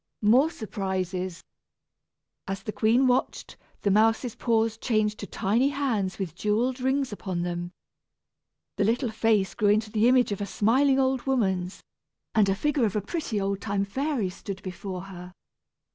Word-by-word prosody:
More 250 +9 +5
surprises! 185 - -4 1.0
As 195 0 -4
the 215 - -4
queen 220 +5 +3
watched, 255 0 0 0.3
the 200 - +1
mouse's 225 +3 +3
paws 225 -2 +1
changed 215 -3 0
to 205 - -6
tiny 230 +8 +1
hands 245 -10 -1
with 185 -5 -4
jewelled 225 +7 0
rings 265 0 0
upon 185 -4 -3
them. 175 0 -3 1.1
The - - +2
little 235 +3 +1
face 220 -3 +1
grew 210 -3 +2
into 215 +1 +2
the 220 +2 +3
image 250 -2 +4
of 205 - -3
a 200 - -2
smiling 260 +8 +3
old 265 -1 0
woman's, 190 -8 0 0.5
and 210 -3 +4
a 195 - +2
figure 290 +2 +1
of 210 - -2
a 210 - +1
pretty 230 - -3
old 195 0 -2
time 200 -1 -1
fairy 255 -2 -1
stood 195 +1 -8
before 185 0 -6
her. 180 -1 -10
215 Hz, 160 wpm, -26 LUFS, 195-245 Hz, 1.1 s, More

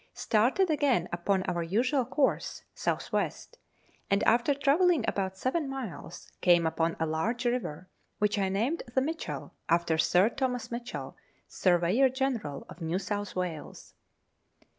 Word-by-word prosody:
Started 260 - +2
again 275 - +2
upon 185 +2 +1
our 175 -2 -1
usual 245 - +1
course 275 +3 0
(south - - -2
west), - - -2 0.5
and, 200 0 +2
after 240 +5 +3
travelling 310 +5 +3
about 190 -1 -1
seven 275 - -1
miles, 265 -9 -7
came 175 -2 +5
upon 165 +1 0
a 160 - +1
large 205 +11 -1
river, 185 -9 -2 0.3
which 210 0 +1
I 195 -1 +1
named 230 - 0
the - - +5
Mitchell, 320 +5 -4 0.2
after 170 -1 +2
Sir 185 +6 +4
Thomas 250 -2 -2
Mitchell, 240 +1 -5 0.3
Surveyor 185 +9 +3
General 250 - -2
of 170 - -12
New 165 +2 -1
South 205 +1 -4
Wales. 180 -4 -5
210 Hz, 140 wpm, -29 LUFS, 175-265 Hz, 0.5 s, came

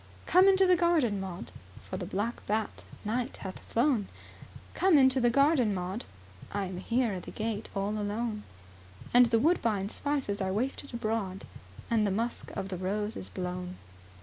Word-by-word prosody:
"Come 370 +2 +6
into 385 0 +6
the 365 -1 +5
garden, 325 - +2
Maud, 185 -2 -6 0.4
For - - -5
the 185 -2 -4
black 205 +5 -2
bat, 215 +1 -1 0.2
night, 240 +4 -2
hath 190 -1 -7
flown, 235 -4 +1 0.7
Come 370 -4 +4
into 260 -1 +5
the 240 - +4
garden, 275 -4 +3
Maud, 185 +5 -4 0.5
I 200 -1 -1
am 185 -1 -6
here 235 +3 +1
at 185 - -4
the - - -9
gate 220 -1 -3
alone; 210 +2 -2 0.7
And 245 0 +7
the 230 0 +3
woodbine 225 - +2
spices 270 -7 -2
are 190 0 0
wafted 265 +6 -2
abroad, 215 -5 -2 0.5
And 215 -2 +3
the - - +1
musk 230 +5 -2
of 195 - -3
the 185 - -4
rose 205 +4 -2
is - - -6
blown." 180 0 -5
215 Hz, 165 wpm, -30 LUFS, 195-255 Hz, 0.7 s, And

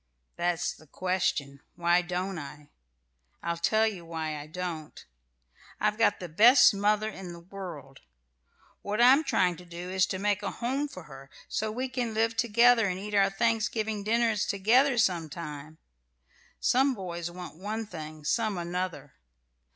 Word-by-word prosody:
"That's 175 0 -1
the 155 - -18
question: 155 -6 -1 0.2
why 175 +1 +3
don't 180 +1 -3
I? 145 0 -10 0.7
I'll 170 0 -2
tell 220 +6 +3
you 200 -6 -3
why 160 -2 -4
I 145 0 -7
don't. 165 -2 -6 0.7
I've 210 +1 0
got 225 -3 +3
the 180 - -6
best 235 - +7
mother 210 +2 +1
in 190 -5 -7
the 170 - -10
world. 170 -7 -9 0.8
What 210 +2 -3
I'm 260 +5 +7
trying 180 - +1
to 180 - -12
do 175 +1 -7
is 190 -1 +2
to 190 - -3
make 205 +1 0
a 200 - -2
home 265 +5 -2
for 185 - -10
her, 135 -2 -13 0.2
so 215 0 -2
we 255 +4 -3
can 245 -3 -3
live 225 +1 +1
together 235 0 +4
and 185 -1 -2
eat 210 +2 -7
our 195 -1 +4
Thanksgiving 220 0 0
dinners 225 -1 +1
together 245 +7 +3
some 175 -7 +1
time. 155 -1 -8 0.8
Some 265 +1 +3
boys 175 -4 -5
want 175 -2 -9
one 215 +4 -4
thing, 155 -5 -9
some 215 +3 0
another. 175 -5 -4
190 Hz, 160 wpm, -28 LUFS, 170-220 Hz, 0.8 s, best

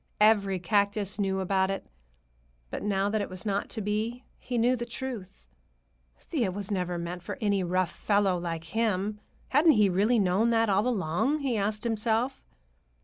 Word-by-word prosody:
Every 205 -3 +4
cactus 200 +2 +1
knew 190 -1 0
about 190 0 +1
it. 195 - -3 0.9
But - - -4
now 200 -1 0
that 215 -1 0
it 200 - -4
was 185 +3 -8
not 200 -1 -1
to 220 - -3
be, 220 +5 -2
he 245 - -4
knew 245 +2 +3
the 240 - -4
truth. 235 -6 -7 0.7
Thea 240 - -2
was 200 +2 -4
never 180 -3 -1
meant 170 +1 -5
for 175 - -6
any 200 -4 +1
rough 180 0 0
fellow 200 -3 +1
like 165 -2 -4
him—hadn't 215 - +1
he 210 -3 +4
really 205 +7 +2
known 200 +3 +2
that 225 -1 +3
all 205 +4 +2
along, 235 - 0
he 265 -4 0
asked 210 +1 -1
himself? 230 +3 0
205 Hz, 165 wpm, -28 LUFS, 190-230 Hz, 0.9 s, Every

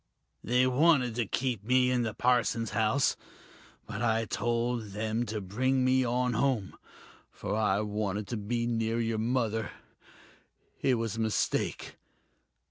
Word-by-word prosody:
They 125 +2 +3
wanted 130 -2 +3
to 120 -4 0
keep 120 -4 -2
me 125 +2 +3
in 125 -1 +2
the 110 -3 -2
parson's 120 -2 +1
house 110 +4 +2 0.7
but 105 - -6
I 115 -1 +1
told 115 -2 -1
them 110 +3 -2
to 105 0 -3
bring 130 +7 0
me 130 0 +3
on 125 +1 0
home, 115 -5 0 0.5
for 100 - -4
I 105 -2 +2
wanted 105 -1 -2
to 120 - -2
be 115 +3 -2
near 115 -1 0
your 115 -1 -1
mother. 115 -3 0 1.1
It 130 -2 +3
was 115 -2 -3
a - - -4
mistake 110 -1 -1
115 Hz, 140 wpm, -29 LUFS, 110-125 Hz, 1.1 s, They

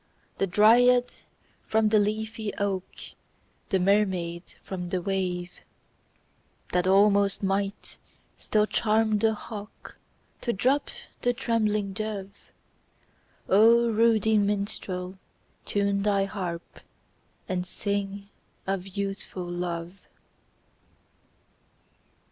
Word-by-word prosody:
The 195 - +2
dryad 245 +6 +5 0.6
from 220 0 +2
the 215 0 +4
leafy 215 +1 -2
oak, 195 -2 -2 0.8
The 190 - +2
mermaid 185 -3 +1 0.2
from 180 -2 -5
the 185 - -1
wave; 180 -1 -2 1.2
That 180 0 +2
almost 200 +1 +4
might 195 +1 -2 0.4
still 210 -1 +1
charm 215 0 +1
the 220 0 +2
hawk 210 -1 -10 0.4
To 235 - -1
drop 260 +8 +1 0.3
the 245 - +2
trembling 215 -5 0
dove? 205 -2 -4 1.2
ruddy 225 0 +4
minstrel, 200 -2 -2 0.5
time 200 -1 +1
thy 200 -1 +2
harp. 180 -4 -6 0.7
And 180 -1 -2
sing 200 +1 -3 0.4
of 195 -1 -2
Youthful 195 -1 -4
Love 175 +1 -4
200 Hz, 90 wpm, -27 LUFS, 190-215 Hz, 1.2 s, dryad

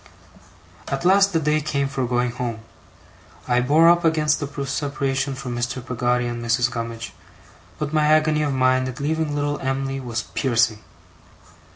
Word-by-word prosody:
At 135 +5 -3
last 195 +2 +5
the 165 - +1
day 155 0 +1
came 140 -2 -1
for 135 -2 -2
going 125 0 0
home. 120 -2 -4 0.9
I 125 0 +2
bore 150 +6 +4
up 175 0 +5
against 155 -2 +2
the 145 - -3 0.2
separation 135 -1 -2
from 130 -2 -5
Mr. 120 +2 -2
Peggotty 125 0 0
and 120 0 -4
Mrs. 120 +1 +1
Gummidge, 115 -1 -5 0.6
but 150 0 -4
my 155 -1 +3
agony 155 0 +3
of 150 -2 0
mind 130 -1 +2
at 130 +2 -7
leaving 155 +1 -1
little 145 0 -1
Em'ly 135 0 -2
was 120 -4 -4
piercing. 115 -4 +1
135 Hz, 160 wpm, -22 LUFS, 125-150 Hz, 0.9 s, last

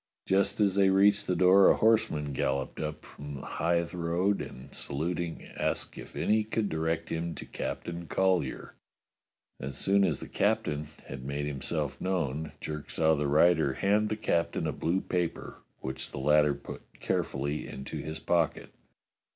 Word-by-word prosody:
Just 100 +2 +2
as 100 -2 +3
they 95 0 +4
reached 100 +2 +4
the 90 - +1
door 95 +2 +7
a - - +5
horseman 110 -11 +2
galloped 70 +1 -1
up 75 0 -4
from 70 0 -8
the 70 - -8
Hythe 85 0 0
Road 90 +4 0
and, 65 +2 -9
saluting, 85 +4 -3
asked - - -2
if - - -10
any 110 +1 +2
could 110 -1 -1
direct 80 +1 -1
him 85 0 -3
to - - -7
Captain 85 0 -5
Collyer. 90 -8 0 0.9
As 70 +1 -3
soon 100 +1 +3
as 85 -7 +1
the - - -7
captain 75 0 0 0.2
had 65 -1 -7
made 70 +2 -3
himself 75 -1 -2
know^n, 80 -5 -1
Jerk 75 -1 -6
saw 80 -1 +3
the 75 -1 0
rider 75 -1 +4
hand 105 +6 +2
the 110 - 0
captain 85 -5 0
a - - 0
blue 90 +4 0
paper, 90 -2 -3 0.2
which 65 0 -4
the - - -8
latter 75 +1 +4
put 70 - -9 0.2
carefully 70 +2 -2
into 65 +1 -6
his 80 +1 -5
pocket. 85 -3 0
80 Hz, 160 wpm, -29 LUFS, 75-95 Hz, 0.9 s, door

